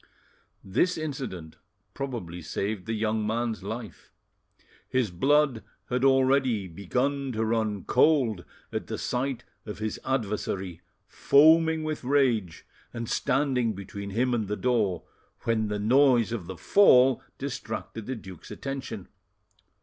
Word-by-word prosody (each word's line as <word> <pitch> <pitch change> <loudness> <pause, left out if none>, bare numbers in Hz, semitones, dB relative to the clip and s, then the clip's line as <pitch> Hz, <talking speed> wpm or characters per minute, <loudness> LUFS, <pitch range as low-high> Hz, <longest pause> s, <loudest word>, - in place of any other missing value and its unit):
This 175 - +1
incident 130 - -5 0.4
probably 115 -11 -5
saved 100 +4 -3
the 115 - -1
young 110 0 0
man's 115 -1 -1
life; 110 +3 -7 0.8
his 125 -6 0
blood 135 +3 +2 0.3
had 125 +1 0
already 130 -5 +3
begun 130 +10 -2
to 110 0 0
run 110 -4 -1
cold 125 - +3 0.3
at - - -3
the - - -4
sight 130 0 -2 0.2
of 105 - -7
his 110 0 -3
adversary 100 -8 -2 0.2
foaming 160 +2 +4
with 155 -3 -3
rage 125 -10 +1 0.3
and 115 -1 -5
standing 130 -5 +1
between 100 +1 -7
him 125 +5 0
and 110 -4 0
the 105 +1 -2
door, 110 -8 0 0.4
when 110 -2 0
the 105 0 -2
noise 120 +2 +4
of 105 -8 -4
the 95 -1 -7
fall 130 - +5 0.2
distracted 115 -5 -5
the 130 - -2
duke's 95 -6 -11
attention. 130 -8 -6
115 Hz, 125 wpm, -27 LUFS, 105-135 Hz, 0.8 s, fall